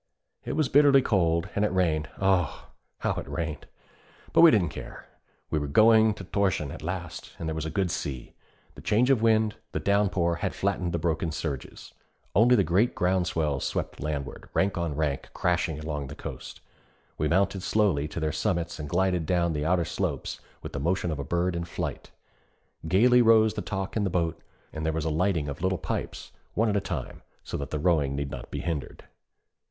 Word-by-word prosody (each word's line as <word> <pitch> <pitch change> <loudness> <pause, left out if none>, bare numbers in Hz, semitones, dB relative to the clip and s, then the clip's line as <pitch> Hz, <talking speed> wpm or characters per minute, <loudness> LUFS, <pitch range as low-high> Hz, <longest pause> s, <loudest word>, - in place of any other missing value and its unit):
It - - -3
was 155 -3 +1
bitterly 140 -1 +6
cold, 85 -6 +2
and 100 - +1
it 105 - +1
rained 80 -5 +1
oh, 95 -4 +1 0.3
how - - +1
it - - -5
rained! 80 -3 -4 0.7
But - - +6
we 170 - +10
didn't 95 - +3
care, - - -9 0.5
we 80 - +1
were 75 - -3
going 110 +6 +5
to 100 - -8
Thorshavn 95 -7 0
at 80 - -8
last, 85 0 -5
and 80 - -5
there 80 - -1
was 80 0 -3
a - - -3
good 90 +2 0
sea. 65 -5 -5 0.4
The - - -12
change 120 +5 +3
of 125 -5 +3
wind, 110 -1 +3 0.2
the - - -1
down 100 0 +2
pour, 85 -3 0
had - - -3
flattened 95 -3 -1
the 85 - 0
broken 80 0 -1
surges. 75 -3 -5 0.4
Only 120 +5 +6
the 100 - +4
great 95 +9 +2
ground 90 -1 +1
swells 75 -5 -1
swept - - -3
landward, 70 -3 -4
rank 95 0 +2
on 85 -4 -2
rank, 75 -3 -2
crashing 85 -3 0
along 75 -2 -4
the 70 - -8
coast. - - -8 0.6
We 75 - +1
mounted 95 +3 +1
slowly 95 -9 +1
to 80 - -5
their 80 -1 0
summits 85 +1 -1
and 75 -1 -5
glided 90 -2 +1
down 85 -2 +1
the 75 0 -2
outer 85 -1 +2
slopes 80 -5 -3 0.2
with - - -7
the - - -3
motion 85 +3 0
of 75 - -4
a - - -2
bird 85 +4 0
in 85 - -2
flight. 85 - -5 0.8
Gayly 120 +8 +5
rose 110 -2 +5
the 105 - -3
talk 95 -1 -4
in 110 - +1
the 100 - +1
boat, 85 -2 -1 0.3
and 80 - -4
there 80 0 0
was 80 0 -2
a 80 - 0
lighting 80 -1 +1
of 70 +3 -6
little 95 0 +1
pipes, - - -5 0.2
one 110 +1 +2
at 105 - 0
a 100 - +2
time, 80 -9 -5 0.2
so - - -6
that 70 - -5
the 75 - -2
rowing 75 -4 +2
need 70 0 -3
not 60 - -7
be - - -4
hindered. 80 -5 -4
85 Hz, 205 wpm, -27 LUFS, 75-100 Hz, 0.8 s, we